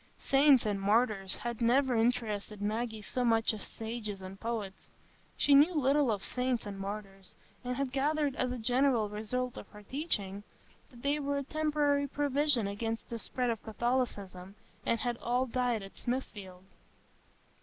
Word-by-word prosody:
Saints 275 -2 +5
and 205 -2 -1
martyrs 205 -2 +2
had 240 -1 -5
never 255 +2 +3
interested 225 -3 0
Maggie 220 +1 -2
so 250 +4 -1
much 225 -2 +3
as 215 - -6
sages 220 -2 -5
and 190 +1 -9
poets. 220 -4 -4 0.5
She 285 - +4
knew 300 +5 +6
little 280 -2 +3
of 205 -2 -2
saints 250 -2 -1
and 200 -1 -6
martyrs, 195 -1 -6 0.3
and 250 0 -2
had 275 -1 -2
gathered, 285 +1 +1
as 255 -1 0
a 250 - -3
general 245 -1 +2
result 235 +4 -3
of - - -8
her 210 -1 -13
teaching, 205 - -2 0.5
that 240 -3 -16
they 285 +1 +1
were 285 0 -1
a 280 - -1
temporary 295 -1 +1
provision 285 -3 +2
against 225 +3 -3
the 230 - -3
spread 250 +2 -1
of 225 - -4
Catholicism, 210 -5 -2 0.3
and 230 - +2
had 240 -1 -1
all 245 +2 0
died 245 -3 0
at 195 - -11
Smithfield. 200 -7 -4
235 Hz, 160 wpm, -31 LUFS, 210-265 Hz, 0.5 s, knew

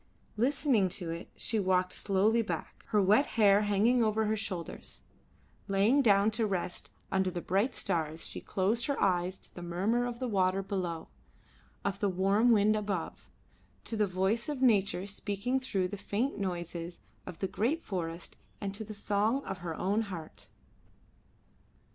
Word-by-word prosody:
Listening 245 -4 +2
to 175 -4 -4
it 165 +1 -6
she 225 - 0
walked 185 -1 +2
slowly 215 +4 +2
back, 220 - -5
her 210 - +2
wet 210 +9 +4
hair 205 -2 +6
hanging 215 +4 +3
over 220 0 +1
her 215 +1 +1
shoulders; 190 -5 -5 0.7
laying 205 +8 +4
down 205 -3 +4
to 225 0 0
rest 180 -2 -3 0.2
under 190 -1 +2
the 180 -1 -4
bright 195 +8 0
stars, 160 -3 -2
she - - -4
closed 215 +5 0
her 280 - -1
eyes 185 -1 +1
to - - -16
the 175 - -8
murmur 195 +8 0
of 240 -1 -5
the 255 +1 -3
water 190 -2 +1
below, 180 -5 -3 0.8
of 200 0 -1
the 205 - +1
warm 195 +5 +3
wind 215 -1 +4
above; 200 -5 -3 0.5
to 225 - -4
the 210 -1 +2
voice 190 +7 0
of 290 -3 -3
nature 200 -7 +3
speaking 205 +5 -2
through 195 -8 -1
the 205 +2 -6
faint 220 +7 -1
noises 175 -3 -4 0.3
of 170 - -7
the 190 - -1
great 260 - -1
forest, 170 -3 -4 0.2
and 195 -1 -3
to 205 - -6
the 215 0 -8
song 210 +6 +1
of 190 - -5
her 170 -2 -4
own 200 +6 +1
heart. 160 - -8
200 Hz, 165 wpm, -31 LUFS, 185-220 Hz, 0.8 s, hair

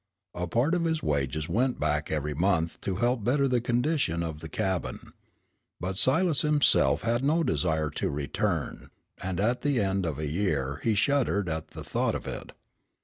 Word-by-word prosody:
A 90 0 -3
part 120 - +1
of 175 -1 +1
his 160 -1 0
wages 75 +1 -1
went 120 +8 0
back 75 0 0
every 75 -1 -1
month 85 0 0
to 95 - -2
help 120 +2 +1
better 135 +5 +2
the 125 -2 +1
condition 120 - 0
of 80 -2 -4
the 80 - -8
cabin. 95 -1 -3 0.7
But 95 +1 -3
Silas 155 0 +3
himself 150 -1 +3
had 120 +2 +1
no 160 +4 +2
desire 80 - 0
to - - -2
return, 70 -1 -2 0.3
and 95 -1 -3
at 120 +5 +1
the 145 -4 +1
end 95 -3 0
of 75 -4 -3
a 75 - -3
year 75 -5 -1
he 110 -2 +2
shuddered 115 -5 +2
at 80 -1 -3
the - - -9
thought - - 0
of - - -5
it. - - -6
95 Hz, 180 wpm, -28 LUFS, 80-130 Hz, 0.7 s, Silas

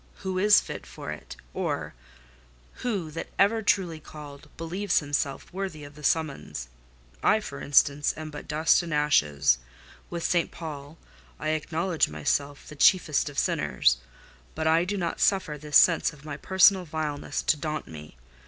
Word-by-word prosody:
Who 185 -1 -1
is 210 +2 +7
fit - - -8
for - - -7
it? 75 - -8 0.2
Or - - -3 0.9
who, 200 -10 -2
that 165 - -6
ever 205 +3 +4
was 220 - -5
truly 175 -5 +1
called, 150 -1 -11
believed 180 +4 -1
himself 145 +1 -2
worthy 185 -6 -5
of 145 0 -11
the 150 +1 -14
summons? 155 - -1 0.5
I, 215 - +4
for 140 -10 -8
instance, 145 +1 +3
am 155 0 -6
but 145 - -9
dust 155 +3 +3
and 170 -3 -3
ashes. 75 - +3 0.5
With 170 -1 -4
St. 175 -2 +1
Paul, 150 -1 -8 0.4
I - - -2
acknowledge 160 +2 0
myself 140 - -2
the 150 - -10
chiefest 155 -1 +3
of 145 - -12
sinners; - - +2 0.6
but 160 - -2
I 165 +2 +4
do 205 +2 -2
not 170 -3 -2
suffer 190 -6 +2
this 150 0 +3
sense 165 -2 +4
of 150 0 -16
my 150 -2 -5
personal 190 +2 +4
vileness 155 -3 -3
to - - +3
daunt 155 0 -4
me. 75 -4 -11
155 Hz, 160 wpm, -27 LUFS, 145-175 Hz, 0.9 s, is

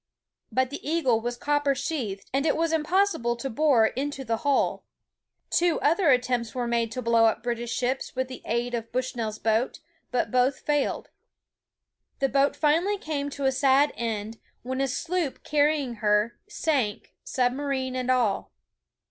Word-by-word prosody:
But 260 0 +1
the 285 - -5
Eagle 275 -8 +1
was 240 +1 -3
copper 290 0 +1
sheathed, 225 -10 -3
and 275 +3 +1
it 300 - +2
was 330 0 +1
impossible 320 -6 +1
to 255 +3 -5
bore 255 -3 +4
into 270 +3 -3
the 225 -1 0
hull. 280 +3 +1 0.7
Two 345 -1 +2
other 330 +2 +3
attempts 250 -2 +1
were 245 -1 -1
made 235 -1 0
to 255 - -4
blow 230 0 +4
up 225 - +1
British 240 -1 -3
ships 260 +2 -2
with 260 0 -1
the 255 - -9
aid 240 +2 -1
of 230 -1 -4
Bush 255 0 -2
nell's 220 -2 -3
boat, 220 +4 0 0.3
but 250 - -1
both 255 +1 +2
failed. 295 -2 -1 1.1
The 270 -1 +1
boat 275 +1 +2
finally 335 +7 +2
came 290 -5 -3
to 280 -1 -4
a 265 - +4
sad 270 +2 +3
end, 225 -1 -4 0.2
when 260 +2 -2
a 275 - +2
sloop 330 +2 -2
carrying 290 -4 +1
her, 210 +2 +1
sank, 265 - -1
submarine 260 0 -1
and 255 0 -2
all. 240 -6 +1
260 Hz, 165 wpm, -26 LUFS, 235-290 Hz, 1.1 s, bore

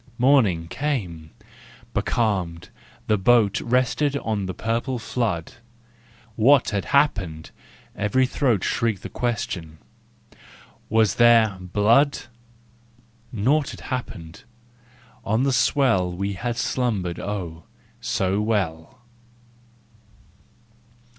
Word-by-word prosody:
Morning 115 -11 +3
came: 90 - -3 0.6
becalmed, 90 -7 -1 0.4
the 105 -2 +1
boat 105 0 +3
Rested 130 +4 +1
on 105 -7 -2
the 95 - -4
purple 115 +3 -2
flood: 110 -8 -3 0.4
" 115 +1 -32 0.3
What 125 +3 +4
had 100 -2 -2
happened? 95 - 0 0.2
" - - -27
every 105 +6 +1
throat 125 -6 0
Shrieked 115 -5 -1
the - - -6
question: 90 -9 -3 0.5
" - - -22 0.3
was 110 -2 +2
there— 115 -3 +5
Blood?" 110 +10 +3 1.1
Naught 135 +7 +1
had - - -9
happened! 85 -10 -6 0.8
On 110 +5 0
the 135 -1 +1
swell 110 -6 +2
We 100 +3 -3
had 120 +4 -4
slumbered, 105 -9 -1
oh, 90 -6 -5 0.3
so 95 +2 -1
well! 105 0 -2
110 Hz, 100 wpm, -23 LUFS, 95-125 Hz, 1.1 s, there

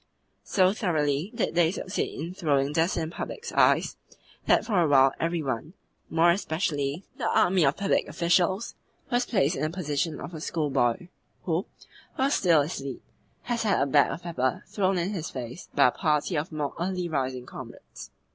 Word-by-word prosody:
So 185 -1 +3
thoroughly 155 -4 0
did 230 - -1
they 170 -1 +4
succeed 190 0 -3
in 165 +4 -5
throwing 145 -5 +1
dust 165 +4 +1
in 160 -1 -2
the - - -14
public's 470 0 -5
eyes - - +3 0.5
that - - +4
for 200 -6 +2
a 165 - +3
while 135 -2 +5
every 165 -1 -1
one 135 +4 -3 0.4
more 165 +1 +4
especially 160 -3 -1 0.2
the - - 0
army 180 -1 +3
of 140 - +1
public 200 0 +1
officials 175 +5 +1 0.4
was 245 0 +1
placed 185 - +2
in - - -4
the 155 - 0
position 155 -2 -2
of 175 - -8
a 160 - -7
schoolboy 150 -1 0 0.3
who, 170 +2 -1 0.5
while 270 +1 +1
still 170 - +4
asleep, 140 -3 -5 0.4
has 240 -1 -2
had 210 -3 +2
a 135 - +3
bag 140 0 +4
of 145 +6 -6
pepper 130 -7 -1
thrown 190 -2 0
in 175 +3 -1
his 170 -6 -4
face 125 +5 -7
by - - +6
a - - -4
party 155 +1 0
of 155 +3 -2
more 150 -2 -3
early 180 0 -2
rising 130 -5 -2
comrades. - - -10
165 Hz, 180 wpm, -27 LUFS, 145-185 Hz, 0.5 s, by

